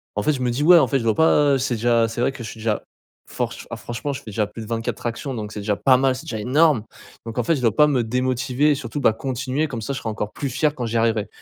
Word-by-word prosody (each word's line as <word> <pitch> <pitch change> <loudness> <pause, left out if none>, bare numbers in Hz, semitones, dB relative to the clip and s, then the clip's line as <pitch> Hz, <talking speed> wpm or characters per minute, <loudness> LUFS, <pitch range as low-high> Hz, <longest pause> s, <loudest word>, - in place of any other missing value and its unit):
en - - -1
fait 155 - +2
je 130 - -4
me 125 - +1
dis: 125 +5 -1
«Ouais, 175 +2 +8
en - - +3
fait, 135 - +1
je - - -4
dois 110 -2 +2
pas, 150 -3 +4
heu, - - +3
c'est 130 -1 -1
déjà, 115 0 +2
c'est 115 +1 -4
vrai 125 - +2
que 135 -3 -9
je 110 - -6
suis 115 - -10
déjà 110 -1 -1 0.4
forch - - -4
ah - - -3
franchement 120 +4 -5
je - - -5
fais - - -22
déjà 105 +1 0
plus 105 +3 -9
de 110 - -8
24 115 0 -3
tractions 120 +3 -4
donc 105 -3 -5
c'est 105 - -6
déjà 105 0 -1
pas 130 +4 +4
mal, 130 0 +2
c'est 130 - -9
déjà 110 - -4
énorme, 140 +2 +3 0.4
donc 115 +1 -4
en - - +1
fait 165 - +2
je 135 - -4
dois 115 -4 +2
pas 150 - +6
me 130 -5 +1
démotiver 130 +4 +1
surtout, 135 +1 -5
bah, 110 - +4
continuer 130 +5 -2
comme 120 -5 -5
ça 140 +6 -3
je - - -4
serai 115 - -4
encore 105 -1 -4
plus 145 - -4
fier 150 +4 0
quand 125 - -3
j'y 115 0 -1
arriverai», 115 -2 +1
125 Hz, 310 wpm, -22 LUFS, 115-140 Hz, 0.4 s, Ouais